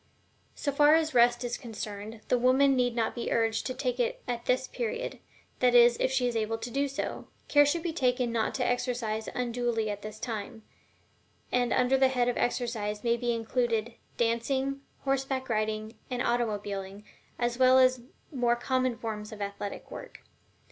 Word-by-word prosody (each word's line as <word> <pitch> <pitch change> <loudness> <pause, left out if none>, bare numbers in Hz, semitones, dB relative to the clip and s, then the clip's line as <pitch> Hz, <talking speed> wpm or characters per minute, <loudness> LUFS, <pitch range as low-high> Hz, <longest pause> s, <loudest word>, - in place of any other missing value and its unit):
So 285 - -1
far 295 +2 +6
as 315 -2 +1
Rest 240 0 +4
is 240 0 -3
concerned, 215 -2 -7
the 250 - +2
woman 265 +2 +4
need 245 -2 +1
not 230 -2 0
be 240 - -4
urged 225 -1 +1
to 255 - -4
take 250 -2 -2
it 240 - -1
at 240 -1 -3
this 255 +1 +1
period 475 +1 -4 0.4
that 250 -1 +4
is, 240 0 +7
if - - +1
she 260 -1 +1
is 240 -1 -1
able 225 0 0
to 230 +2 -6
do 280 +2 +1
so. 275 +1 -4 0.2
Care 290 0 +5
should 325 +3 0
be 340 -2 -2
taken 250 -4 +1
not 230 -1 0
to 250 - 0
exercise 240 -3 -1
unduly 240 -3 -1
at 205 0 -6
this 215 0 -7
time, 220 -1 -5 0.9
and 245 -1 +1
under 255 +1 +3
the 265 - +6
head 250 -2 +1
of 245 - +1
exercise 225 -4 -1
may 235 -1 +3
be 240 0 -1
included 230 0 -1 0.2
dancing, 265 +4 0 0.2
horseback 270 -1 -1
riding, 215 0 -1 0.2
and 250 -1 -1
automobiling, 205 -4 -2 0.3
as 240 0 -1
well 255 0 +6
as 255 0 +5
the 240 0 -17 0.3
more 240 -2 +2
common 255 0 0
forms 210 -2 -5
of 215 - -9
athletic 200 0 -5
work. - - -9
240 Hz, 180 wpm, -29 LUFS, 225-255 Hz, 0.9 s, is